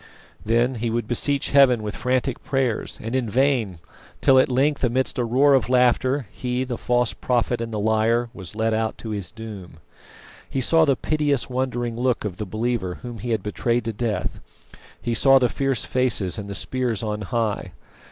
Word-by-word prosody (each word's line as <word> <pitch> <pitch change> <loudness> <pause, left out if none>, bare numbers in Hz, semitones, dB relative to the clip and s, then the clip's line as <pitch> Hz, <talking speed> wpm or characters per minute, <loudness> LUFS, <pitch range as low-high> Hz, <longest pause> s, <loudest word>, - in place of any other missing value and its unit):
Then 120 +4 +2
he 120 - 0
would 115 -1 -2
beseech 140 +4 -1
Heaven 130 -5 +5
with 105 0 -4
frantic 130 0 -1
prayers, 130 -3 -1
and 115 +2 -4
in 125 -4 0
vain, 125 -6 +1 0.4
till 130 -1 +5
at 130 - +3
length, 140 +3 +1
amidst 130 +1 0
a - - +2
roar 135 +5 +4
of 130 -2 +2
laughter, 130 +2 +2
he, 125 0 -2
the 125 -2 -5
false 125 -2 +1
prophet 120 -1 0
and 115 0 -4
the 110 - -3
liar, 110 +3 +2
was 95 -2 -9
led 110 0 0
out 110 0 -1
to 110 - -6
his 100 -4 -3
doom. 110 -7 -9 0.7
He 135 - -2
saw 160 +5 +4
the 140 -3 +3
piteous 145 -3 0
wondering 120 -2 -2
look 125 -1 0
of 95 -3 -4
the 105 - -4
believer 110 -3 -2
whom 120 -2 -7
he 120 - -5
had 110 -4 0
betrayed 115 +3 -1
to 115 - -2
death; 110 0 -2 0.6
he 120 - -2
saw 135 +4 +6
the 125 -2 +3
fierce 135 -1 -1
faces 115 -6 0
and 100 0 -7
the 100 - -5
spears 125 -3 -2
on 105 -1 -3
high. 105 -4 -2
120 Hz, 190 wpm, -23 LUFS, 110-130 Hz, 0.7 s, saw